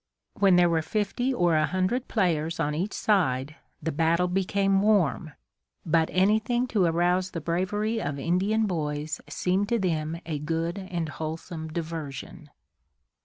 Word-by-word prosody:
When 195 -2 +4
there 175 0 +5
were 165 -1 +1
fifty 215 +8 -1
or 175 -10 +2
a 155 -1 +3
hundred 185 +7 -1
players 165 -6 0
on 150 - 0
each 180 +7 -2
side, 150 -7 +1 0.3
the 160 - -1
battle 165 +3 +2
became 195 +1 +1
warm; 185 -6 +2 0.5
but 160 0 +2
anything 220 +6 +2
to 200 -6 +2
arouse 175 +2 +2
the 170 - -5
bravery 205 +7 -1
of 145 -6 -3
Indian 190 +9 +1
boys 155 -4 -3
seemed 190 +3 0
to 235 - +2
them 165 -4 -1
a 155 -3 -3
good 165 +4 -2
and 175 -4 -3
wholesome 160 +2 -5
diversion. 155 -1 -6
175 Hz, 145 wpm, -27 LUFS, 160-195 Hz, 0.5 s, there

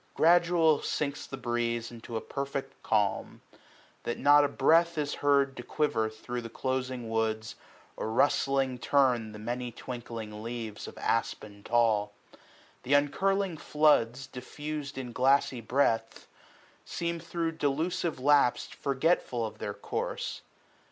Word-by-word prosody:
Gradual 170 -2 +4
sinks 145 -1 -2
the 135 - -6
breeze 120 -2 -2
Into 115 0 -6
a - - -3
perfect 140 0 -5
calm; 105 -2 0 0.6
that 120 - -3
not 145 +1 +6
a - - +3
breath 165 +5 +3
155 150 - +2
Is 145 - -5
heard 140 -1 +3
to - - -4
quiver 120 -6 0
through 120 +3 -6
the 115 - -7
closing 130 -1 -3
woods. 110 0 -1 0.4
Or - - -3
rustling 135 +1 +2
turn 125 -4 +2
the 105 - -9
many 120 +3 -4
twinkling 115 -3 -7
leaves 115 -2 -5
Of - - -10
aspin 105 -2 -2
tall. 110 -3 +2 0.7
Th' 135 - 0
uncurling 190 +5 +2
floods, 135 -4 +2
diflFiis'd 145 +3 -6
In 125 -2 -5
glassy 130 0 +2
breadth, 115 -2 0 0.6
seem 170 0 -3
thro' 165 0 -2
delusive 160 +2 -1
lapse 140 -2 +3
Forgetful 135 -4 0
of 110 - -8
their - - -4
course. - - -4
130 Hz, 130 wpm, -29 LUFS, 115-145 Hz, 0.7 s, not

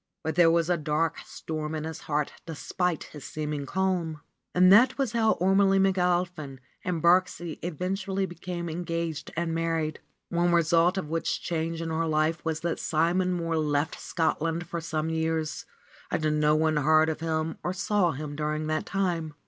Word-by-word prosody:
But 160 - -1
there 170 +1 +5
was 165 0 +2
a 175 -1 +2
dark 155 +1 0
storm 155 0 -5
in 155 - -3
his 160 0 -5
heart 150 -1 -2
despite 170 +1 -2
his 150 -3 -11
seeming 150 -2 -4
calm. 180 -5 -1 0.3
And 185 +1 +7
that 250 +5 +6
was 270 -5 0
how 225 -1 +3
Ormelie 195 +2 +3
McAlpin 180 -6 +1 0.3
and 175 -4 -2
Birksie 175 -1 +2
even 180 +2 -2
tually 195 0 -2
became 175 -1 -5
engaged 165 -2 -3
and 170 -1 -1
married, 165 -2 -1 0.3
one 175 0 +2
result 170 +2 +3
of 185 - -2
which 165 0 -1
change 165 0 -2
in 165 - -3
her 165 +1 0
life 155 +1 +1
was 160 -1 -2
that 170 -1 -2
Simon 175 +3 +1
Mohr 165 -1 -1
left 145 +1 -1
Scotland 165 0 -1
for 170 0 -4
some 160 0 -2
years 160 -1 -2 0.4
and 155 -1 0
no 150 0 +4
one 155 0 +2
heard 155 +2 +4
of 160 - -2
him 160 0 -2
or 175 - -1
saw 190 0 +1
him 145 0 -6
during 155 +1 -2
that 155 0 -1
time. 170 -5 -1
165 Hz, 175 wpm, -27 LUFS, 155-180 Hz, 0.4 s, And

